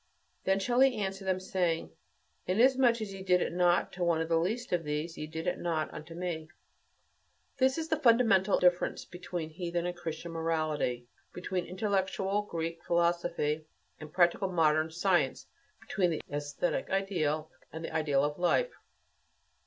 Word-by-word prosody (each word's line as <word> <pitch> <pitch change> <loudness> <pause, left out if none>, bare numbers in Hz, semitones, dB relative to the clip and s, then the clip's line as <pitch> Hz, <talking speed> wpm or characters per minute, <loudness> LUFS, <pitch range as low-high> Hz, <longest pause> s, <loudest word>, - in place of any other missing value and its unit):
Then 195 +1 +3
shall 240 +5 +1
he 265 -1 +5
answer 195 -1 -3
them, 185 -1 0
saying, 175 - -1 0.6
"Inasmuch 240 +4 +4
as 205 -2 -4
ye 195 - -8
did 180 -1 +3
it - - -2
not 175 0 +2
to 180 - -3
one 170 -2 +2
of 165 0 -2
the 165 -1 +3
least 220 +7 -2
of 175 -2 +1
these, 150 +2 -3
ye 155 - -5
did 160 +1 -6
it 180 - -1
not 155 -2 -3
to 165 - -9
me." 170 -3 -4 1.1
This 260 +2 +3
is 320 -1 -2
the 315 -2 0
fundamental 225 -7 +4
difference 180 0 +2
between 175 -2 -6
heathen 175 0 -3
and 175 0 -2
Christian 170 -1 -6
morality; 155 -7 -1 0.3
between 180 0 -3
intellectual 195 +1 0
Greek 165 -4 -4
philosophy 170 -3 0 0.3
and 155 -1 -9
practical 180 +2 +2
modern 155 -2 +3
science; 175 +2 +1 0.3
between 185 -4 0
the 160 - -3
æsthetic 145 +3 -2
ideal 160 -6 -1 0.2
and 160 +1 -6
the - - -7
ideal 150 -3 +2
of 150 +2 -2
"life." 485 - +2
175 Hz, 160 wpm, -31 LUFS, 160-195 Hz, 1.1 s, he